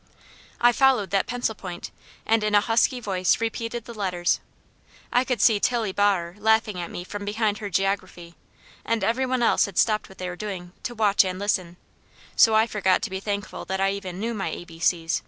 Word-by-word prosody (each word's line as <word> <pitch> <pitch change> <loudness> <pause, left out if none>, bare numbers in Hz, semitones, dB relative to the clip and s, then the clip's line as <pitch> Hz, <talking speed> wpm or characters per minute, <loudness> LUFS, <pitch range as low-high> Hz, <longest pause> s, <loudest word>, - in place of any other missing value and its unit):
I 240 0 +6
followed 255 -5 +3
that 195 -1 +1
pencil 245 -2 -1
point 180 -4 -8 0.3
and 225 -1 +2
in 210 0 +1
a 205 - +6
husky 235 +4 +2
voice 190 -5 +1
repeated 230 +1 -3
the 235 - -9
letters. 180 -5 0 0.7
I 245 - +4
could 250 -2 -2
see 220 -3 +4
Tillie 230 -3 0
Baher 190 -4 +1
laughing 220 -2 +2
at 170 - -5
me 175 - -6
from 205 +2 -7
behind 210 0 -1
her 205 - -5
geography, 185 -3 -2 0.5
and 230 -3 -1
every 245 +6 +1
one 255 -1 0
else - - +4
had 195 - -10
stopped 215 -2 +2
what 190 - -15
they 185 - -4
were 180 - -5
doing 180 -3 -6
to 240 - -4
watch 210 -3 +4
and 185 -1 -3
listen, 185 -3 -1 0.6
so 220 -1 +6
I 220 +1 +5
forgot 195 -5 +1
to - - -3
be 190 - -3
thankful 200 0 -4
that 190 0 -3
I 195 0 +2
even 190 -2 -6
knew 230 +3 -2
my 200 -3 -3
a - - -6
b 165 -1 -13
c's. 165 -1 +1
205 Hz, 210 wpm, -25 LUFS, 185-225 Hz, 0.7 s, I